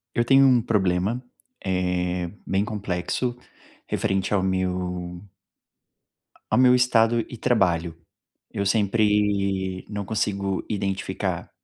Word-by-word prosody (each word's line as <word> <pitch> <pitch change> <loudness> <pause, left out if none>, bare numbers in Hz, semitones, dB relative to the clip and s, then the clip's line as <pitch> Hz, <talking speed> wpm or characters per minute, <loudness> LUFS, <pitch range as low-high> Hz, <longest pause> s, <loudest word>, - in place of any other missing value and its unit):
Eu 120 - +2
tenho 135 +2 +6
um 125 -2 +5
problema, 100 +2 0 0.4
eh, 90 -2 -1
bem 95 +2 0
complexo, 105 +3 -2 0.5
referente 95 -1 -1
ao 100 - +3
meu 90 -1 -2 1.3
ao - - +3
meu 125 0 +6
estado 120 -2 +3
e 120 - -8
trabalho. 90 -9 +1 0.6
Eu 100 - -2
sempre 100 -3 +1
não 105 -1 -4
consigo 100 -2 -1
identificar 100 -2 -3
100 Hz, 105 wpm, -24 LUFS, 90-110 Hz, 1.3 s, tenho